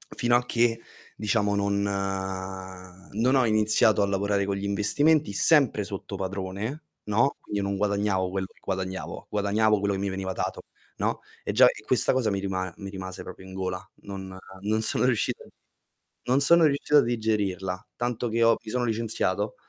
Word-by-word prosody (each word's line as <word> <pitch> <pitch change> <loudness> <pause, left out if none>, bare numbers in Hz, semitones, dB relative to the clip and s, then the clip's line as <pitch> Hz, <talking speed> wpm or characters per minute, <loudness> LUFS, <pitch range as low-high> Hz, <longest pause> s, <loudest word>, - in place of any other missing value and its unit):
fino 120 0 +2
a 125 - -2
che, 115 -1 +1 0.4
diciamo 105 -1 +1
non 100 0 +1 1.3
non 120 +6 +2
ho 130 - +4
iniziato 110 -1 +3
a - - +4
lavorare 100 0 0
con 100 0 -1
gli 100 - -5
investimenti 145 +8 +2
sempre 140 -3 +3
sotto 100 0 -6
padrone, 100 - -4 0.2
no, 115 +6 +2
quindi 105 - -4
io - - -2
non 100 - -1
guadagnavo 100 -2 0
quello 95 0 -2
che - - -26
guadagnavo, 95 0 -4
guadagnavo 105 +1 +2
quello 100 0 0
che 95 - -3
mi 100 - -1
veniva 95 0 -3
dato, - - -3 0.4
no, - - -1 0.2
e - - -2
già - - +7
e - - -1
questa - - +3
cosa 125 -4 +1
mi 100 - -1
rima 95 -2 -3
mi 100 -1 -7
rimase 95 -1 -7
proprio 95 +1 -10
in 95 - -10
gola. 95 -1 -4 0.2
Non 95 -2 -7 0.2
non 110 +2 0
sono 110 - +1
riuscito 120 -4 0
a - - -16 0.8
non 130 +3 +3
sono 170 +3 +6
riuscito 150 0 +3
a - - +6
digerirla, 105 -4 -1
tanto 120 0 -2
che 115 +1 +1
ho 115 0 +5
mi 110 - -7
sono 125 0 0
licenziato 110 -3 -1
105 Hz, 180 wpm, -26 LUFS, 95-115 Hz, 1.3 s, già